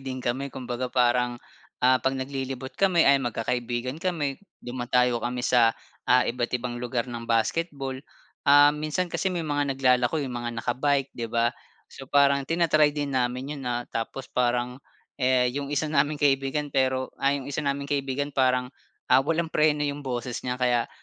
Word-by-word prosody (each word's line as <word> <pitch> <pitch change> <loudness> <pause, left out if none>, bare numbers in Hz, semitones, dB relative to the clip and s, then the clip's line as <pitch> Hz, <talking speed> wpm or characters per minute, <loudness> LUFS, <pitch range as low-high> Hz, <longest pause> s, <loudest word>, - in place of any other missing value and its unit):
din 130 -1 -6
kami 135 +3 -1
kumbaga 125 -1 -4
parang, 125 -1 +2 0.5
ah, 130 0 +5
'pag 135 0 0
naglilibot 130 0 -5
kami 180 +2 +3
ayan, 140 0 +5
magkakaibigan 120 +4 -3
kami, 155 -7 -2 0.2
dumadayo 125 -1 +1
kami 125 0 -3
sa, 115 -2 +4 0.3
ah, 125 +1 +5
iba't 120 0 -1
ibang 120 0 -5
lugar 120 -1 -2
ng 120 -2 -7
basketball. 135 +4 0 0.5
Ah, 145 +1 +6
minsan 155 +4 -2
kasi 190 - 0
may 175 -3 -3
mga 145 -2 -1
naglalako 125 +1 +3
'yong 130 - -5
mga 120 - -3
naka-bike, 135 +2 0
'di 115 -1 -5
ba. 115 +1 +1 0.4
So, 135 -1 -11
parang 140 -1 +3
tina-try 160 -3 +3
din 145 -1 -2
namin 125 +2 -1
'yon, 145 -2 -7
ah, 120 0 -2
tapos 125 +3 -5
parang, 125 +1 0 0.4
eh, 125 -1 +3
'yong 140 +1 -4
isa 150 +2 -1
naming 145 +1 +2
kaibigan, 140 0 0
pero, 130 -1 0
ah, 135 - +3
'yong 140 0 -6
isa 145 - -1
naming 140 -1 -2
kaibigan 140 0 -2
parang, 125 -1 +1 0.4
ah, 130 - +7
walang 165 +3 -1
preno 150 -1 +2
'yong 145 0 -3
boses 125 -3 -4
niya 125 0 -3
kaya, 125 -2 +1
130 Hz, 170 wpm, -26 LUFS, 125-145 Hz, 0.5 s, ah